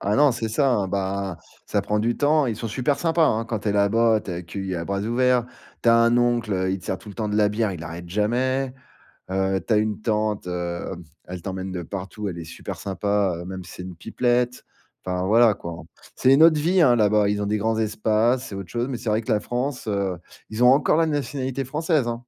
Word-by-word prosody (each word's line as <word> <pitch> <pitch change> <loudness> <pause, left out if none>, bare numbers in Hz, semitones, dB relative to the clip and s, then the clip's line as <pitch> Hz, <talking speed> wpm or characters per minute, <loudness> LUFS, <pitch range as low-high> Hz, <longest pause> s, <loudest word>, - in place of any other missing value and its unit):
Ah 100 +2 0
non, 145 -1 +5
c'est 115 -2 -3
ça, 135 +4 +2
hein, 100 -5 0
ben, 95 -2 -2 0.3
ça - - 0
prend 105 0 -1
du 115 +2 0
temps. 150 0 +3
Ils 115 - -1
sont 115 - -4
super 130 +6 0
sympas, 165 -1 +3
hein, 115 +1 0
quand 110 -4 -3
tu 105 - -2
es - - +2
là-bas, 110 +2 +3
tu 95 - -8
es - - -3
accueilli 95 +2 -5
à 85 - -3
bras 100 +2 -2
ouverts. 120 +2 +2 0.4
Tu 115 - +3
as 115 - +7
un 115 +1 +4
oncle, 120 -3 +1
heu, 95 0 0
il 95 - -1
te - - -16
sert 95 - -2
tout 110 - -14
le 100 - -9
temps 110 -1 -2
de 105 - 0
la 105 -1 +4
bière, 105 -1 0
il 85 -2 -7
arrête 85 +1 -7
jamais, 125 +6 0 0.6
heu, 95 0 0
tu 115 - +2
as - - +4
une 110 0 -1
tante, 105 -3 -1
hem, 90 0 -4 0.2
elle 90 -1 -7
t'emmène 95 0 -5
de 90 -1 -4
partout, 100 +3 -5
elle 85 - -6
est 80 - -7
super - - -7
sympa, 100 -1 0
heu, - - -8
même 95 -1 -7
si - - -11
c'est 90 - -8
une 90 -1 -8
pipelette, 120 +4 0 0.4
enfin, 90 0 -1
voilà 115 +2 +5
quoi, 85 -4 -8 0.3
c'est 130 +1 +4
une 145 - +5
autre 155 -2 +6
vie, 175 +4 +3
hein, 125 -6 +6
là-bas. 105 -2 +3
Ils 105 0 0
ont - - -1
des 105 +1 0
grands 110 +2 0
espaces, 110 +3 +1
c'est 100 - -7
autre 95 -3 -7
chose 120 +1 -1
mais 130 - -3
c'est 115 - -4
vrai 110 +2 +1
que 115 - -4
la 105 - +2
France, 125 0 -3
heu 100 -3 -1 0.3
ils 110 +3 -1
ont 125 - +8
encore 145 +2 +3
la 165 - +4
nationalité 135 -2 -2
française, 150 -1 0
hein! 120 - -1
110 Hz, 250 wpm, -23 LUFS, 95-120 Hz, 0.6 s, ont